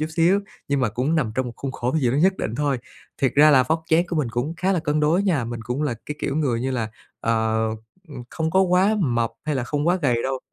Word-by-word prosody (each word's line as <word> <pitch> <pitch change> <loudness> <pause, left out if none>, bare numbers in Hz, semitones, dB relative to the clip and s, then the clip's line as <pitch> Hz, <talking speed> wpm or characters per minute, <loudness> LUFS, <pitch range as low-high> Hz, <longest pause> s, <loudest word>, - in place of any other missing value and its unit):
chút 155 - 0
xíu 180 +5 +4 0.3
nhưng 140 -1 +1
mà 125 - +2
cũng 125 +9 -1
nằm 120 -8 0
trong 130 -1 -1
một 120 - -6
khuôn 135 -1 -5
khổ 125 +1 -2
gì 125 -6 +2
đó 135 - 0
nhất 190 +5 +3
định 115 - -3
thôi. 145 -2 0 0.4
Thiệt 135 - +1
ra 150 +2 +7
là 130 -3 +6
vóc 160 +5 -1
dáng 170 +2 +4
của 175 - -3
mình 140 -6 0
cũng 125 +8 -2
khá 190 +3 +1
là 180 - +1
cân 150 0 0
đối 160 +6 +3
nha, 170 -11 +1
mình 115 0 -5
cũng 125 +6 -3
là 145 -5 0
cái 150 - -4
kiểu 140 - -2
người 130 -7 0
như 130 +1 -1
là, 115 -4 -2 0.3
ờ, 110 -1 +1 0.5
ừm, 140 -5 -8
không 160 -1 -2
có 190 - +3
quá 190 +3 +3
mập 120 -6 +1
hay 150 -1 -1
là 130 - -1
không 145 +4 -2
quá 175 +2 +3
gầy 120 -4 +2
đâu. 135 0 -2
140 Hz, 275 wpm, -23 LUFS, 120-160 Hz, 0.5 s, ra